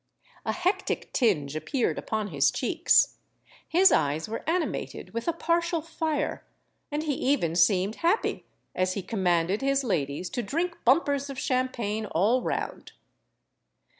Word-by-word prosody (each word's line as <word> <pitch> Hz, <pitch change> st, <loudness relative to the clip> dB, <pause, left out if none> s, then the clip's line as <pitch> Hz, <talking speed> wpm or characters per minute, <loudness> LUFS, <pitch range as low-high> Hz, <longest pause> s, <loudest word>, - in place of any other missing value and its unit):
A -, -, +2 dB
hectic 360 Hz, +2 st, -1 dB
tinge 155 Hz, -, +1 dB
appeared 245 Hz, -, -1 dB
upon 215 Hz, -2 st, -3 dB
his 140 Hz, -4 st, +3 dB
cheeks; -, -, +2 dB, 0.5 s
his 375 Hz, +4 st, +5 dB
eyes 150 Hz, +2 st, +1 dB
were 225 Hz, +1 st, -4 dB
animated 345 Hz, -1 st, -2 dB
with 230 Hz, +5 st, -4 dB
a -, -, +4 dB
partial 335 Hz, +1 st, 0 dB
fire; 315 Hz, -2 st, -2 dB, 0.5 s
and 295 Hz, +1 st, -1 dB
he 305 Hz, -2 st, 0 dB
even 255 Hz, -, 0 dB
seemed 185 Hz, +4 st, +3 dB
happy, 345 Hz, +7 st, 0 dB, 0.3 s
as 185 Hz, 0 st, 0 dB
he 195 Hz, -, -4 dB
commanded 185 Hz, -1 st, +1 dB
his 275 Hz, 0 st, +1 dB
ladies 170 Hz, -, -2 dB
to 255 Hz, -, -2 dB
drink 335 Hz, -, -2 dB
bumpers 280 Hz, +1 st, +3 dB
of 275 Hz, -, -6 dB
champagne 250 Hz, -6 st, -1 dB
all 215 Hz, +10 st, +2 dB
round. -, -, -4 dB
245 Hz, 135 wpm, -27 LUFS, 185-305 Hz, 0.5 s, his